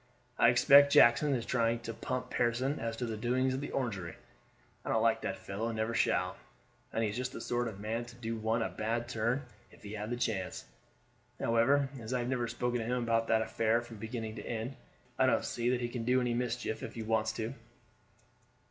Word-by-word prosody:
"I 115 - +7
expect 140 +4 +7
Jackson 135 +4 +6
is 120 -2 -3
trying 115 -1 +1
to 115 -1 -5
pump 125 +2 -4
Pearson 125 +4 0
as 115 0 -3
to 120 - -2
the 115 -2 -3
doings 125 +4 +1
at 130 - -2
the 145 - -4
Orangery. 100 -10 -3 0.7
I - - -6
don't 110 - +2
like 115 0 +3
that 95 - -3
fellow, 100 +4 -4
and 115 -1 -3
never 110 +1 -1
shall, - - +1 0.5
and 115 - 0
he 105 - 0
is - - -6
just 125 +1 -3
the - - -6
sort 120 0 -1
of 105 -3 -7
man 115 +3 -2
to 120 0 -12
do 115 -1 -4
one 110 +1 0
a - - -2
bad 115 +2 -2
turn 120 +3 0 0.3
if - - -19
he 105 0 -7
had 105 0 -4
the 120 - -2
chance. 95 - -2 0.7
However, 135 +5 +3
as 115 +2 -4
I - - +3
have 120 - -3
never 125 -2 0
spoken 120 +1 -1
to 115 - -3
him 125 +1 0
about 115 -1 +1
that 110 0 +3
affair 115 +1 +1
from 115 -2 -11
beginning 110 0 -5
to - - -6
end, 115 +3 -4 0.4
I - - +5
don't - - +2
see 120 0 -1
that 125 0 +1
he 120 - 0
can 120 -1 -4
do 125 +2 +3
any 125 -1 0
mischief 120 -2 -2
if - - -7
he 115 - -4
wants 110 0 +1
to." 110 +3 -3
115 Hz, 225 wpm, -32 LUFS, 110-125 Hz, 0.7 s, I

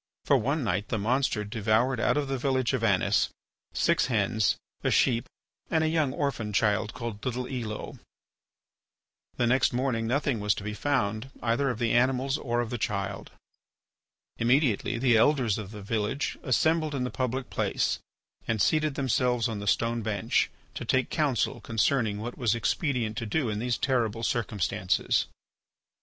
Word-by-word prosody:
For - - +4
one 140 +6 0
night 100 -2 -1
the - - -1
monster 115 +1 +1
devoured 110 +4 +1
out 120 - +2
of 145 -1 0
the 135 -1 -2
village 130 -1 +1
of 125 -3 -1
Anis 100 -6 +2 0.4
six - - +2
hens, 110 -3 +1 0.3
a - - +2
sheep, 120 -3 +2 0.4
and 160 - +2
a - - +2
young 155 -4 +1
orphan 125 -7 -2
child 105 0 +1
called 115 -3 -6
little 125 -1 -2
Elo. 115 -5 -5 1.4
The 120 - +2
next 120 +1 +3
morning 120 -3 0
nothing 135 -1 0
was 105 -1 +1
to - - -6
be 105 +1 -4
found 115 -1 -1
either 120 +4 +1
of 125 - -2
the 115 -1 0
animals 130 +3 +2
or 120 -2 0
of 115 - -4
the 120 - -3
child. 100 -2 -3 1.1
Immediately 125 -1 +2
the 120 -1 +4
Elders 120 -4 +3
of 100 -3 -6
the 105 -1 -9
village 110 +6 -1
assembled 155 +3 +1
in 130 - -1
the 125 - -3
public 130 0 -3
place - - 0 0.5
and 115 -1 0
seated 155 +4 +2
themselves 125 -3 +1
on 110 -3 -4
the 100 - -6
stone 115 +3 +1
bench 105 -1 0 0.2
to - - -5
take 130 -1 +1
counsel 145 -6 0
concerning 115 -1 +1
what 120 +3 -5
it - - -17
was 120 -3 +2
expedient 115 - -1
to 115 - -3
do 130 +2 0
in 105 -1 -2
these 120 0 0
terrible 115 -5 0
circumstances. 100 -5 0
120 Hz, 165 wpm, -28 LUFS, 110-130 Hz, 1.4 s, For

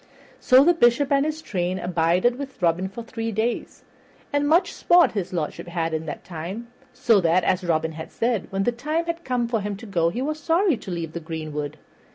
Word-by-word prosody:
So 260 +1 +6
the 350 +4 +5
Bishop 275 -2 +3
and 275 0 +4
his 310 +1 -4
train 180 -1 -2
abided 180 +8 +1
with 275 -2 -7
Robin 180 +1 +1
for 230 +4 -8
three 230 -1 -4
days, 220 +3 -2 0.5
and 290 0 +2
much 340 +4 +3
sport 350 0 +4
his 200 -5 -3
lordship 165 -1 -4
had 165 -1 -2
in 160 0 -3
that 145 - -6
time, 185 +8 -6 0.2
so 230 -4 +3
that, 170 +1 +3
as 185 0 +1
Robin 160 -2 0
had 160 0 -8
said, 230 -3 -1
when 195 0 0
the 245 - +2
time 305 +8 -2
had 335 0 -4
come 250 -4 -1
for 230 -2 -1
him 205 0 -3
to 230 - -11
go 170 -5 +1
he 205 - -4
was 305 +2 -2
sorry 335 +1 +2
to 210 - -10
leave 165 -3 -4
the 170 - -4
greenwood. 155 -2 -5
205 Hz, 210 wpm, -24 LUFS, 170-255 Hz, 0.5 s, So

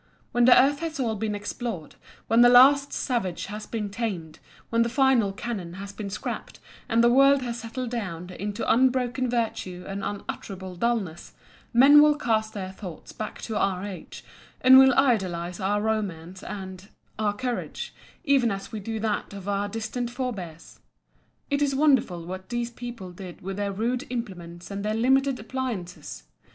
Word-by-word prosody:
When 240 0 +3
the 250 - +8
earth 280 +2 +3
has 325 -2 -4
all 230 -4 0
been 215 0 -2
explored, 205 -4 -5 0.3
when 225 +2 +4
the 245 - +8
last 275 +3 +7
savage 210 -10 -2
has 210 +1 -7
been 210 -3 -3
tamed, 195 -8 -4 0.3
when 230 0 +3
the 235 - +2
final 255 -5 +3
cannon 195 -4 -5
has 195 +2 -8
been 200 0 -5
scrapped, 195 - -5 0.3
and 230 0 +3
the 240 - +5
world 275 +1 +5
has 240 -1 -4
settled 240 +1 -5
down 185 -7 -4
into 205 +4 -4
unbroken 255 0 +2
virtue 200 -6 -2
and 195 0 -5
unutterable 190 -2 -6
dulness, 195 -5 -2 0.4
men 275 +5 +8
will 300 0 +5
cast 220 -5 0
their 190 -2 -4
thoughts 190 -3 -9
back 215 -1 -6
to 220 - -4
our 190 -1 0
age, 195 -3 -9 0.4
and 260 +1 +9
will 265 -1 +6
idealize 185 -10 +1
our 200 +2 +1
romance 190 -5 -3
and—our 195 +2 -5
courage, 245 +2 -4 0.3
even 275 -6 +3
as 195 -1 -5
we 220 - -4
do 220 +2 -4
that 215 -1 -2
of 200 -1 -8
our 205 0 -1
distant 225 +3 -3
forbears. 210 - -6 0.7
"It 285 0 +1
is 280 -2 +2
wonderful 265 - +2
what 185 +1 -7
these 240 0 -2
people 235 -6 -8
did 180 -1 -10
with 195 +1 -5
their 205 -1 -1
rude 240 +6 -2
implements 180 -8 -6
and 200 0 -4
their 215 +1 -1
limited 265 +3 +2
appliances!" 225 -7 -5
220 Hz, 165 wpm, -26 LUFS, 190-245 Hz, 0.7 s, and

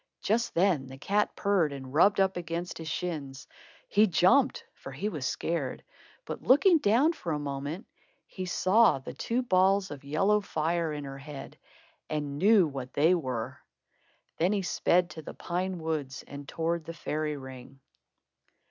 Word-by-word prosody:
Just 230 +3 0
then 170 -7 +2
the 130 +1 -10
cat 205 +9 0
purred 195 -7 +1
and 135 -1 -8
rubbed 195 +7 +4
up 190 0 +2
against 170 0 -4
his 160 - -7
shins. 150 -5 -4 0.4
He 210 +2 +4
jumped, 225 - +3
for - - -10
he 210 - -3
was 145 -9 -3
scared; 160 -6 -3 0.4
but - - -6
looking 330 +6 +5
down, 255 +9 +3
for 170 - -5
a - - 0
moment, 145 - -5 0.4
he 185 -1 -6
saw 190 +2 +4
the 130 - -8
two 245 +2 -1
balls 190 -3 +3
of 145 -2 -8
yellow 195 +9 +2
fire 165 -3 -1
in 150 -1 -5
her 135 0 -7
head 140 -1 -9 0.5
and 145 -2 -3
knew 200 0 +6
what 135 -3 -7
they 160 +5 +4
were. 130 -9 -3 0.8
Then 175 +5 +2
he 200 -2 0
sped 180 0 +2
to 160 - -8
the - - -9
pine 180 +1 -3
woods 155 -5 -3
and 140 0 -9
towards 165 0 -2
the 165 - -7
fairy 155 -1 -3
ring. 130 0 -11
165 Hz, 165 wpm, -29 LUFS, 140-195 Hz, 0.8 s, knew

